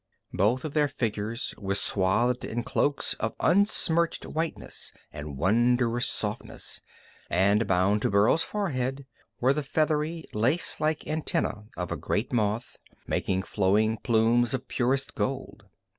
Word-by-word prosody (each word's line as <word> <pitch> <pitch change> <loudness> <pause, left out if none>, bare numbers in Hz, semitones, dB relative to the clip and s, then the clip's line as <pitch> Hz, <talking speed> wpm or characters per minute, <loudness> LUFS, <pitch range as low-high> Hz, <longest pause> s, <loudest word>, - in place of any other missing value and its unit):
Both 120 +7 +1
of 150 - -4
their 150 -1 +3
figures 115 -3 -3
were 100 -1 -1
swathed 115 +6 +1
in 120 +1 -3
cloaks 145 +4 +1
of 110 - -2
unsmirched 170 -3 +2
whiteness 160 +1 -4 0.2
and 75 -2 -7
wondrous 120 - +2
softness, 105 +2 -5 0.5
and 100 +4 +3
bound 95 +3 +2
to - - +1
Burl's 100 +10 +4
forehead 135 -10 -2 0.3
were 130 +2 +4
the 150 - -1
feathery, 155 +2 0
lacelike 155 +6 0
antenna 130 -9 -2
of 90 -1 -3
a - - -1
great 110 +5 -2
moth, 110 +1 -1 0.3
making 95 0 -1
flowing 105 +3 +2
plumes 115 +3 +2
of 130 0 -6
purest 130 +2 0
gold. 130 -6 -3
120 Hz, 130 wpm, -27 LUFS, 105-140 Hz, 0.5 s, Burl's